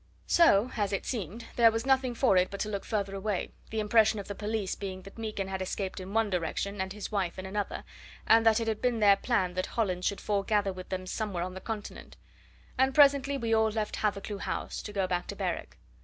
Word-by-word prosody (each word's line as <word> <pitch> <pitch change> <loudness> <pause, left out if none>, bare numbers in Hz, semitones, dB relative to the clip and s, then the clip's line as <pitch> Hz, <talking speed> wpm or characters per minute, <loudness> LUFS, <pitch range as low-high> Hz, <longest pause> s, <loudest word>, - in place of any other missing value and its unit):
So 255 -8 +5
as 205 -2 0
it 195 - -2
seemed 225 - -4
there 235 -1 +7
was 225 +2 -2
nothing 265 -2 +2
for 240 -5 +3
it 180 0 +4
but 200 - -7
to 215 - -1
look 200 -2 -4
further 200 -3 -2
away, 195 -1 -2 0.2
the 220 - -2
impression 215 0 +4
of 200 - -7
the 205 - -4
police 210 -1 -2
being 190 -2 -6
that 195 +4 -12
Meekin 215 -3 -3
had 190 0 -4
escaped 190 +1 -3
in 185 +1 -7
one 220 -1 +1
direction 190 +3 -2
and 190 0 -3
his 210 +2 -6
wife 190 -5 -1
in 185 - -6
another, 200 +1 -3 0.4
and 225 0 +6
that 225 -1 +5
it 230 - -2
had 220 -1 -1
been 245 -2 +1
their 205 -2 +6
plan 195 -4 0
that 185 0 -2
Hollins 185 -5 -1
should 200 - -2
foregather 200 -1 0
with 185 0 -9
them 185 -1 -3
somewhere 190 -2 -2
on 185 +1 -5
the 190 - -8
Continent; 220 -2 -7 0.6
and 265 0 +3
presently 280 -1 +5
we 230 -3 -1
all 220 0 +4
left 215 -1 -2
Hathercleugh 205 -1 -2
House - - -3
to 210 - -7
go 195 -2 0
back 180 -1 -2
to - - -5
Berwick. - - -3
205 Hz, 230 wpm, -29 LUFS, 190-225 Hz, 0.6 s, there